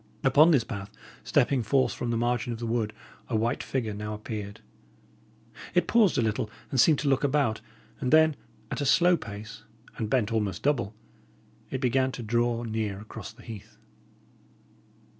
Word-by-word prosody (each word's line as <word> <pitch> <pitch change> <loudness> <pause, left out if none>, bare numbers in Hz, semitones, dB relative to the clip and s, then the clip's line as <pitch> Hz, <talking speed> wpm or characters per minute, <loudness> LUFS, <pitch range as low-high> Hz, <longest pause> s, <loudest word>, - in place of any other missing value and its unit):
Upon 145 +5 +6
this 140 -8 +4
path, 100 -3 -6 0.3
stepping 130 +1 +2
forth 130 +4 +2
from 120 - -4
the 115 - 0
margin 120 0 0
of 115 - -4
the 120 - -5
wood, 115 -2 0 0.4
a 120 - -1
white 115 +4 0
figure 115 -5 -2
now 105 +1 -4
appeared. 105 -1 -6 1.2
It 180 - +4
paused 220 -5 +4
a 120 - +3
little, 110 -1 -1 0.2
and 130 - 0
seemed 150 +5 +6
to 145 - -2
look 135 0 +2
about; 140 -6 +1 0.4
and 125 - -1
then, 160 -1 +6 0.4
at - - -2
a - - 0
slow 175 +6 +5
pace, 105 -7 -8 0.4
and 110 - -2
bent 115 -2 +1
almost 105 -5 -1
double, 120 -8 0 0.7
it 130 - -3
began 130 +1 +2
to 120 - -6
draw 120 +1 0
near 110 -3 -2
across 110 0 -9
the 120 +2 -17
heath. 110 -1 -10
120 Hz, 170 wpm, -27 LUFS, 110-135 Hz, 1.2 s, Upon